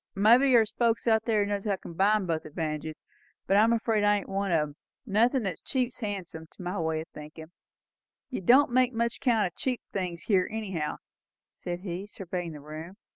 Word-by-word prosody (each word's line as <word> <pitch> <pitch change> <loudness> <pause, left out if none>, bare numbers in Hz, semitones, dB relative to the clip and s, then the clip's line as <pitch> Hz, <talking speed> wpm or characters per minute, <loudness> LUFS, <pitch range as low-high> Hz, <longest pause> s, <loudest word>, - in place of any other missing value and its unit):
Well 195 - -2
maybe 250 +5 +6
there's 225 -3 +5
folks 230 -2 +1
that 220 -1 +2
knows 205 -2 +1
how 210 - +1
to - - -2
combine 195 +4 +1
both 165 -2 -1
advantages 155 0 -4 0.5
but 195 - +2
I'm 220 +3 +5
afeard 225 -2 +1
I 205 0 +4
ain't 200 - -7
one 195 0 -1
of 165 -2 +3
'em. 145 - -15 0.3
Nothin' 235 +4 +2
that's 185 -5 -4
cheap's 255 -2 -2
handsome, 190 -7 -5
to - - -12
my 180 +2 -3
way 160 -1 -1
o' - - -8
thinkin'. 155 +2 -10 0.8
You 250 - -3
don't 250 +8 +5
make 255 0 +3
much 235 +1 -1
count 230 -5 +2
o' 175 - -4
cheap 255 -3 -2
things 180 -3 -3
here 190 -4 +2
anyhow," 195 -9 -3 0.5
said 175 0 -6
he, 185 +1 -5
surveying 180 -4 -5
the 150 - -10
room. 155 +5 -8
200 Hz, 195 wpm, -28 LUFS, 170-225 Hz, 0.8 s, maybe